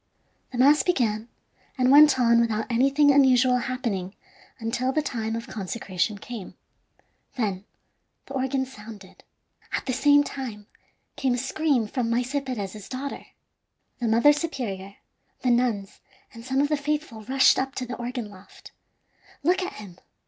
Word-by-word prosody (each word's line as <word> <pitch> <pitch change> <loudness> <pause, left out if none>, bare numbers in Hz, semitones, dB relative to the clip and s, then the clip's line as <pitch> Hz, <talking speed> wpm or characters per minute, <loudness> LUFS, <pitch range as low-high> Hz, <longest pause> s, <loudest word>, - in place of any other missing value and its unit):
The 250 - -6
mass 285 +4 +5
began, 235 -9 0 0.5
and 255 0 +3
went 290 -1 +7
on 235 -1 +5
without 220 -2 0
anything 275 +4 +4
unusual 255 -2 +5
happening 235 -7 -3 0.4
until 240 +3 -1
the 305 +2 0
time 225 -5 -3
of 230 - -5
consecration 200 0 -3
came. 220 -1 -8 0.8
Then 205 -6 -2 0.6
the - - -10
organ 265 0 -1
sounded. 210 -6 -13 0.5
At - - -2
the 255 - -1
same 290 +3 +5
time 240 -8 -7 0.5
came 260 -2 +1
a - - -3
scream 270 -1 0
from 230 +2 -2
Maese 245 +2 0
Perez's 210 -6 -6
daughter. 270 +2 -6 0.7
The 240 - -1
mother 235 +7 +5
superior, 220 - -4 0.5
the 250 - +2
nuns, 235 -5 0 0.3
and 230 -1 -11
some 265 +2 0
of 290 - +1
the 300 - +1
faithful 295 -5 -3
rushed 265 +3 +4
up 270 +1 -3
to 255 - -3
the 250 +1 -5
organ 245 -1 -4
loft. 190 0 -15 0.7
"Look 360 +5 +2
at 370 - -4
him! 190 -4 -11
250 Hz, 150 wpm, -25 LUFS, 220-270 Hz, 0.8 s, went